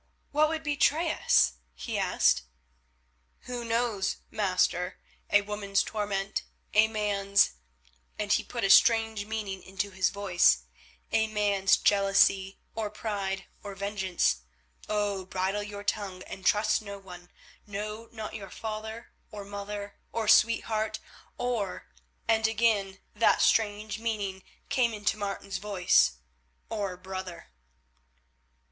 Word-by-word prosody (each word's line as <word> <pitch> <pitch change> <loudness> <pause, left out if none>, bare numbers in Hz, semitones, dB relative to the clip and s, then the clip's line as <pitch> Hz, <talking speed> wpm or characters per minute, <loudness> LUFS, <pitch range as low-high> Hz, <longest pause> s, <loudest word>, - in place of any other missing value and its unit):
"What 305 +1 +3
would 320 0 -3
betray 305 +2 +2
us?" 60 - +3 0.2
he - - -3
asked. - - +3 1.0
"Who 245 -1 -5
knows, 230 -4 0 0.2
master? 185 -3 0 0.3
A 205 - +5
woman's 200 -1 0
torment, 200 -2 -2 0.3
a 215 +1 +6
man's—" 200 -2 +2 0.7
and 205 -1 +1
he - - +2
put 235 -2 -5
a 195 - +4
strange 225 0 +5
meaning 210 -4 -4
into 195 +1 -4
his 185 0 +1
voice, 175 - +3 0.5
"a 220 0 +3
man's—jealousy, 195 -1 +3 0.2
or 220 -2 -2
pride, 200 -3 -3 0.2
or 200 -1 -7
vengeance. 190 - 0 0.5
Oh! 205 -2 0
bridle 190 +2 -1
your 205 0 -7
tongue 200 -3 -2
and 190 0 -5
trust 210 +1 +3
no 200 -1 -7
one, 180 -2 -12 0.4
no, 210 +2 -5
not 220 -2 -6
your 200 -3 -7
father 220 +2 -6 0.2
or 205 -2 -8
mother, 205 0 -6
or 225 -1 -2
sweetheart, 220 -1 +3 0.4
or—" 235 -6 -2 0.4
and 220 -1 +3
again 215 -3 +1 0.2
that 220 +2 +3
strange 215 0 +2
meaning 205 -4 -2 0.3
came 250 -5 +1
into 210 +1 0
Martin's 200 -2 -4
voice, 180 - +3 0.6
"or 200 -4 -3
brother." 185 - -7
205 Hz, 120 wpm, -29 LUFS, 195-220 Hz, 1.0 s, a